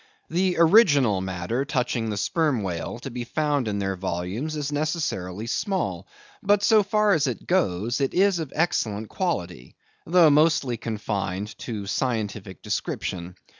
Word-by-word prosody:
The 180 Hz, +1 st, +1 dB
original 150 Hz, -, +5 dB
matter 95 Hz, +7 st, -2 dB
touching 125 Hz, -5 st, -1 dB
the 105 Hz, -, -3 dB
sperm 135 Hz, -, 0 dB
whale 90 Hz, +3 st, -4 dB
to 135 Hz, -, -6 dB
be 120 Hz, 0 st, -4 dB
found 145 Hz, 0 st, 0 dB
in 105 Hz, -1 st, -1 dB
their 95 Hz, -1 st, -1 dB
volumes 95 Hz, -, -3 dB
is 145 Hz, -1 st, -3 dB
necessarily 145 Hz, -, -2 dB
small; 190 Hz, -, -2 dB, 0.3 s
but 205 Hz, 0 st, +3 dB
so 215 Hz, 0 st, +6 dB
far 210 Hz, +1 st, +2 dB
as 150 Hz, -3 st, +2 dB
it 125 Hz, -, -4 dB
goes, 120 Hz, -, 0 dB
it 135 Hz, -, 0 dB
is 190 Hz, -1 st, +3 dB
of 155 Hz, -5 st, -5 dB
excellent 110 Hz, -10 st, 0 dB
quality, 90 Hz, -, -3 dB, 0.3 s
though 165 Hz, -2 st, +6 dB
mostly 150 Hz, -4 st, +3 dB
confined 105 Hz, -2 st, -3 dB
to 105 Hz, -4 st, -5 dB
scientific 105 Hz, -, -3 dB
description. 90 Hz, 0 st, -3 dB
125 Hz, 145 wpm, -25 LUFS, 100-160 Hz, 0.3 s, so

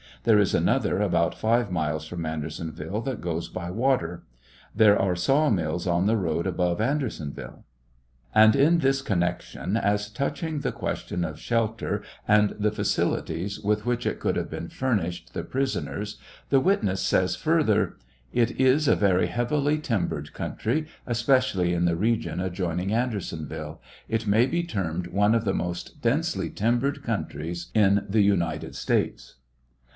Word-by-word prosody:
There 110 Hz, -3 st, +5 dB
is 100 Hz, -, +2 dB
another -, -, +1 dB
about -, -, +1 dB
five 115 Hz, -2 st, +1 dB
miles 80 Hz, -2 st, -1 dB
from 85 Hz, 0 st, -5 dB
Andersonville 80 Hz, +4 st, -4 dB
that 130 Hz, +1 st, -4 dB
goes 85 Hz, -1 st, -3 dB
by 85 Hz, -1 st, -5 dB
water. 105 Hz, -7 st, 0 dB, 0.5 s
There 105 Hz, -2 st, +6 dB
are 95 Hz, -2 st, +1 dB
saw 135 Hz, -, +3 dB
mills 85 Hz, -4 st, -1 dB
on 85 Hz, +1 st, +2 dB
the 110 Hz, +2 st, +3 dB
road 85 Hz, -4 st, -1 dB
above 90 Hz, -1 st, 0 dB
Andersonville. 110 Hz, -, -3 dB, 0.7 s
And 110 Hz, 0 st, +7 dB
in 155 Hz, +5 st, +4 dB
this 135 Hz, -2 st, +2 dB
connection, 90 Hz, -1 st, -1 dB
as 105 Hz, -1 st, 0 dB
touching 145 Hz, +6 st, -2 dB
the -, -, -1 dB
question 90 Hz, -, -3 dB
of 80 Hz, -2 st, -5 dB
shelter 115 Hz, -2 st, -1 dB, 0.2 s
and 105 Hz, 0 st, +4 dB
the 105 Hz, 0 st, +2 dB
facilities 95 Hz, -2 st, -1 dB
with 105 Hz, +1 st, 0 dB
which 120 Hz, 0 st, -1 dB
it -, -, -1 dB
could, -, -, 0 dB
have -, -, -2 dB
been -, -, -6 dB
furnished 100 Hz, -10 st, -2 dB
the -, -, -2 dB
prisoners, 130 Hz, -6 st, -3 dB, 0.3 s
the 135 Hz, -, +5 dB
witness 105 Hz, -, +1 dB
says -, -, +2 dB
fur -, -, +2 dB
ther: -, -, +1 dB, 0.3 s
It 120 Hz, 0 st, +1 dB
is 135 Hz, +3 st, +4 dB
a -, -, +5 dB
very 95 Hz, -3 st, +3 dB
heavily 145 Hz, +5 st, 0 dB
timbered 90 Hz, -, -2 dB
country, 150 Hz, +8 st, -2 dB, 0.2 s
especially 120 Hz, -7 st, +2 dB
in 85 Hz, 0 st, +1 dB
the 85 Hz, -1 st, +2 dB
regiou'adjoining 95 Hz, -3 st, -1 dB
Andersonville; 80 Hz, -, -3 dB, 0.3 s
it 110 Hz, -1 st, -2 dB
may 110 Hz, +4 st, +4 dB
be 170 Hz, +5 st, -1 dB
termed 90 Hz, -, -3 dB
one 100 Hz, +4 st, +2 dB
of 115 Hz, -1 st, 0 dB
the 95 Hz, -, +1 dB
most 90 Hz, 0 st, -4 dB
densely -, -, 0 dB
timbered 125 Hz, +6 st, 0 dB
couotries 85 Hz, -, -3 dB
in 100 Hz, -1 st, +4 dB
the 105 Hz, +2 st, +3 dB
United 100 Hz, -4 st, 0 dB
States. -, -, -1 dB
105 Hz, 150 wpm, -26 LUFS, 85-120 Hz, 0.7 s, And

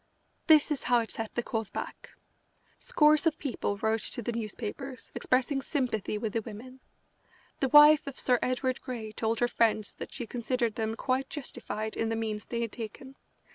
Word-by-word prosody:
This 310 Hz, -2 st, +6 dB
is 285 Hz, -, 0 dB
how 245 Hz, -1 st, +3 dB
it 225 Hz, -, -5 dB
set 225 Hz, -1 st, -5 dB
the 240 Hz, -, 0 dB
cause 225 Hz, -3 st, -3 dB
back. -, -, -6 dB, 0.7 s
Scores 305 Hz, +1 st, +4 dB
of 310 Hz, -1 st, +1 dB
people 240 Hz, -7 st, -2 dB
wrote 220 Hz, +1 st, 0 dB
to 240 Hz, -, -4 dB
the 240 Hz, -, -1 dB
newspapers 235 Hz, +4 st, -6 dB
expressing 265 Hz, +2 st, +1 dB
sympathy 245 Hz, -8 st, -1 dB
with 210 Hz, -1 st, -3 dB
the 225 Hz, -, 0 dB
women. 235 Hz, +5 st, -10 dB, 0.8 s
The 270 Hz, -, +1 dB
wife 295 Hz, +1 st, +8 dB
of 280 Hz, -, -6 dB
Sir 250 Hz, -2 st, +3 dB
Edward 255 Hz, 0 st, -1 dB
Grey 235 Hz, -5 st, -5 dB
told 220 Hz, +1 st, -1 dB
her 240 Hz, -, +4 dB
friends 220 Hz, -3 st, +1 dB
that -, -, -8 dB
she 245 Hz, -, -5 dB
considered 235 Hz, 0 st, -1 dB
them 220 Hz, 0 st, -2 dB
quite 265 Hz, +3 st, -1 dB
justified 230 Hz, -6 st, -5 dB
in 225 Hz, -, -1 dB
the 225 Hz, -, 0 dB
means 220 Hz, -2 st, -3 dB
they 235 Hz, -1 st, -2 dB
had 230 Hz, -2 st, -2 dB
taken. 250 Hz, +4 st, -8 dB
240 Hz, 180 wpm, -29 LUFS, 220-265 Hz, 0.8 s, wife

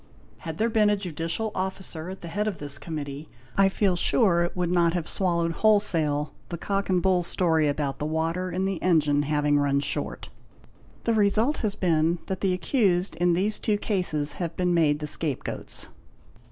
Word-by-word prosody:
Had 160 Hz, -2 st, -6 dB
there 225 Hz, -, +2 dB
been 215 Hz, -2 st, +4 dB
a 210 Hz, -, +3 dB
Judicial 180 Hz, +3 st, -3 dB
Officer 185 Hz, -3 st, -4 dB
at 190 Hz, -, -8 dB
the 170 Hz, -, -7 dB
head 205 Hz, +6 st, -2 dB
of 200 Hz, -5 st, -2 dB
this 145 Hz, -1 st, -3 dB
Committee, 150 Hz, -2 st, -6 dB, 0.3 s
I 195 Hz, 0 st, +4 dB
feel 195 Hz, -1 st, +1 dB
sure 175 Hz, -1 st, +3 dB
it 175 Hz, -, -3 dB
would 175 Hz, -1 st, 0 dB
not 170 Hz, -2 st, +3 dB
have 175 Hz, -3 st, -2 dB
swallowed 170 Hz, -3 st, +1 dB
wholesale 165 Hz, -8 st, +2 dB, 0.2 s
the 170 Hz, -, -4 dB
cock 195 Hz, +3 st, -2 dB
and 180 Hz, -2 st, +2 dB
bull 185 Hz, -2 st, +3 dB
story... 165 Hz, -3 st, +2 dB
about 145 Hz, -1 st, -2 dB
the 150 Hz, -, -2 dB
water 165 Hz, +4 st, -1 dB
in 185 Hz, +2 st, -1 dB
the 195 Hz, -3 st, -2 dB
engine 150 Hz, -5 st, +3 dB
having 145 Hz, 0 st, +1 dB
run 140 Hz, -1 st, +2 dB
short. 140 Hz, -, -3 dB, 0.7 s
The 230 Hz, -, +1 dB
result 220 Hz, +7 st, +2 dB
has 210 Hz, -3 st, -1 dB
been 165 Hz, -1 st, +1 dB
that... 190 Hz, -1 st, -4 dB
the 195 Hz, -, +2 dB
accused 185 Hz, -, +1 dB
in 175 Hz, 0 st, +3 dB
these 200 Hz, +5 st, 0 dB
two 210 Hz, -1 st, +1 dB
cases 175 Hz, -9 st, 0 dB
have 170 Hz, -1 st, -3 dB
been 180 Hz, -1 st, +1 dB
made 155 Hz, -3 st, +3 dB
the 150 Hz, -, -5 dB
scape 150 Hz, -2 st, -1 dB
goats. -, -, -4 dB
175 Hz, 190 wpm, -26 LUFS, 155-195 Hz, 0.7 s, been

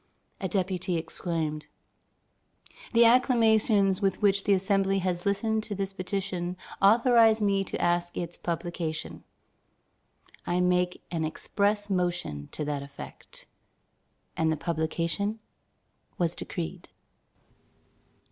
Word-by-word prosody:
A 190 Hz, -, -2 dB
deputy 185 Hz, -1 st, -1 dB
exclaimed: 160 Hz, -2 st, -3 dB, 1.2 s
"The 235 Hz, 0 st, +6 dB
acclamations 220 Hz, -5 st, +4 dB
with 195 Hz, -1 st, +1 dB
which 200 Hz, -1 st, +2 dB
the 200 Hz, -, +4 dB
Assembly 195 Hz, 0 st, +2 dB
has 180 Hz, -1 st, -1 dB
listened 220 Hz, +2 st, +1 dB
to 205 Hz, -, -4 dB
this 195 Hz, 0 st, -3 dB
petition 185 Hz, -2 st, -3 dB, 0.2 s
authorize 225 Hz, +1 st, +5 dB
me 200 Hz, -2 st, +2 dB
to -, -, -5 dB
ask 175 Hz, 0 st, 0 dB
its 175 Hz, 0 st, -3 dB
publication: 170 Hz, -2 st, -4 dB, 1.2 s
I 175 Hz, +1 st, +1 dB
make 180 Hz, 0 st, +1 dB
an 165 Hz, -2 st, -1 dB
express 205 Hz, +6 st, -1 dB
motion 175 Hz, -, -2 dB
to 150 Hz, -, -3 dB
that 145 Hz, -1 st, -2 dB
effect." 140 Hz, 0 st, -10 dB, 0.9 s
And 160 Hz, 0 st, +1 dB
the 160 Hz, -, 0 dB
publication 170 Hz, +6 st, -1 dB, 0.8 s
was 170 Hz, -1 st, 0 dB
decreed. 175 Hz, +1 st, -6 dB
185 Hz, 110 wpm, -28 LUFS, 170-200 Hz, 1.2 s, The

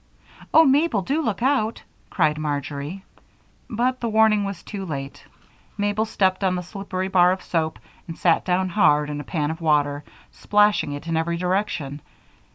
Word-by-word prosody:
"Oh, 320 Hz, -, +7 dB
Mabel! 275 Hz, -, +2 dB
Do 285 Hz, -, 0 dB
look 225 Hz, -5 st, -2 dB
out!" 260 Hz, -5 st, +1 dB, 0.3 s
cried 150 Hz, 0 st, +1 dB
Marjory. 145 Hz, +4 st, -4 dB, 0.6 s
But 250 Hz, +3 st, 0 dB
the 235 Hz, -, -2 dB
warning 220 Hz, -1 st, +4 dB
came 200 Hz, -, -2 dB
too 200 Hz, -2 st, -6 dB
late. 140 Hz, -6 st, -6 dB, 0.5 s
Mabel 205 Hz, +1 st, 0 dB
stepped 190 Hz, -3 st, 0 dB
on 185 Hz, -1 st, +2 dB
the 180 Hz, -, -3 dB
slippery 190 Hz, 0 st, -4 dB
bar 180 Hz, -2 st, +4 dB
of 185 Hz, 0 st, -3 dB
soap 160 Hz, -2 st, -1 dB, 0.3 s
and 165 Hz, -, -7 dB
sat 170 Hz, -2 st, +2 dB
down 185 Hz, +1 st, 0 dB
hard 150 Hz, -6 st, +3 dB
in 145 Hz, 0 st, -4 dB
a -, -, -9 dB
pan 150 Hz, 0 st, -2 dB
of 160 Hz, +2 st, -7 dB
water, 145 Hz, -2 st, +1 dB, 0.3 s
splashing 210 Hz, -7 st, +2 dB
it 145 Hz, -, -7 dB
in 165 Hz, -1 st, -2 dB
every 170 Hz, +1 st, -1 dB
direction. 175 Hz, -6 st, -2 dB
185 Hz, 165 wpm, -23 LUFS, 155-210 Hz, 0.6 s, Oh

